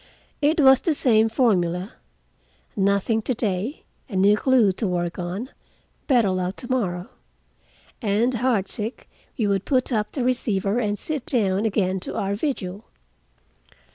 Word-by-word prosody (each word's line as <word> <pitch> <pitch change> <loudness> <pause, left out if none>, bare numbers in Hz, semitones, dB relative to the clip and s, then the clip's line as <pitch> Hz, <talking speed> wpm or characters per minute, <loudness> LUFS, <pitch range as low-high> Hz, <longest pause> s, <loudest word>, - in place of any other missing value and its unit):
It 305 +3 +2
was 265 -2 +7
the 325 -4 0
same 225 -5 +3
formula. 190 -5 +1 0.8
"Nothing 200 +3 +1
to 250 +3 -2
day. 215 - -2 0.3
A 200 - -6
new 200 +2 +5
clue 240 -3 +3
to 200 +3 -3
work 175 -1 -2
on. 185 +9 -4 0.6
Better 235 -8 +3
luck 185 0 -2
to 245 - -8
morrow." 180 -8 -1 0.9
And 220 +4 +1
heartsick 225 -1 -2 0.3
we 225 - +1
would 200 -1 +1
put 255 -2 0
up 210 -2 -1
the 265 - -2
receiver 225 -4 0
and 210 -3 -1
sit 295 +3 -4
down 205 -3 +1
again 190 -3 0
to - - -6
our 200 0 -1
vigil. 205 -5 -3
210 Hz, 140 wpm, -23 LUFS, 190-250 Hz, 0.9 s, was